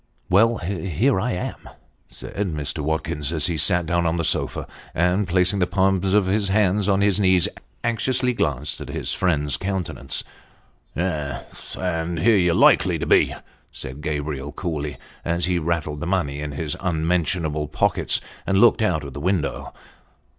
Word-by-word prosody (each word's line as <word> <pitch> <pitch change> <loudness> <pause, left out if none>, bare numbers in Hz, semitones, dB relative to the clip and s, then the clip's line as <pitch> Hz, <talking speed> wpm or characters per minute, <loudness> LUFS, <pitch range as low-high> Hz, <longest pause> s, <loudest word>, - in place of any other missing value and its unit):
" - - -41
Well, 115 +5 +5
here 95 - 0
I 125 +2 -1
am," 90 - -5 0.4
said - - -10 0.2
Mr. 75 0 -4
Watkins, 75 -1 -2
as 80 -3 0
he 85 - 0
sat 85 +3 +2
down 85 0 +1
on 80 - +1
the 85 - -1
sofa; 80 - 0 0.3
and 90 +4 +2
placing 90 +2 +2
the 90 - +2
palms 95 0 +2
of 105 -2 +4
his 100 +2 +1
hands 100 0 +2
on 100 0 +3
his 100 0 +3
knees, 95 -3 +4 0.4
anxiously 125 +2 +1
glanced 75 - -1
at - - -7
his - - -1
friend's 75 -6 0
countenance. 95 -7 -3 0.7
"Yes; 80 -6 -4
and 85 -2 -2
here 110 +8 +4
you're 90 -3 +3
likely - - +5
to - - -3
be," - - +4 0.4
said 65 +2 -8
Gabriel, 75 -2 -3
coolly, 75 -5 -4 0.3
as 85 +1 0
he 90 -1 +1
rattled 80 -2 -2
the 85 - -4
money 75 -6 -1
in 75 -1 -4
his 75 +1 -2
unmentionable 80 -2 0
pockets, 75 - +1 0.3
and 95 - +2
looked 115 +2 +5
out 90 -8 +1
of 70 -2 -8
the 70 - -6
window. 90 -5 -1
85 Hz, 165 wpm, -23 LUFS, 75-95 Hz, 0.7 s, Well